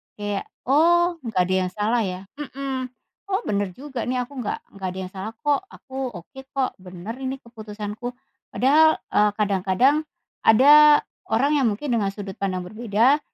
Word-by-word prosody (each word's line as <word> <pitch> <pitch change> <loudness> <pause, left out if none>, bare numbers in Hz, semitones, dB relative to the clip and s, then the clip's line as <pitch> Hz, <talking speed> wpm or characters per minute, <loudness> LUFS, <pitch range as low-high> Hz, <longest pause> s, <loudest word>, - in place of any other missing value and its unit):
Kayak, 205 -1 -3 0.2
oh 345 +5 +3
nggak 225 - -1
ada 185 +1 -1
yang - - -8
salah 220 +4 +1
ya, 185 0 -4 0.2
mhm. 270 -2 -4 0.4
Oh 390 +2 0
bener 200 -2 -1
juga 265 -3 -5
nih 250 0 0
aku 265 +1 -9
nggak 220 - -3 0.2
nggak 190 -1 -4
ada 190 - -6
yang 185 - -8
salah 195 +3 -6
kok, 295 +4 +2
aku 265 -2 -6
oke 180 +10 -11
kok, 270 -2 0
bener 185 +4 -8
ini 265 0 -3
keputusanku. 220 +1 -7 0.4
Padahal, 310 +5 +5 0.2
eee, 210 0 +4
kadang-kadang 210 +9 +2 0.4
ada 295 +6 +8 0.3
orang 240 +7 +2
yang 260 - +3
mungkin 245 +8 -4
dengan 220 -4 +1
sudut 195 -2 -7
pandang 185 -2 -2
berbeda, 225 +7 +2
235 Hz, 160 wpm, -23 LUFS, 205-275 Hz, 0.4 s, ada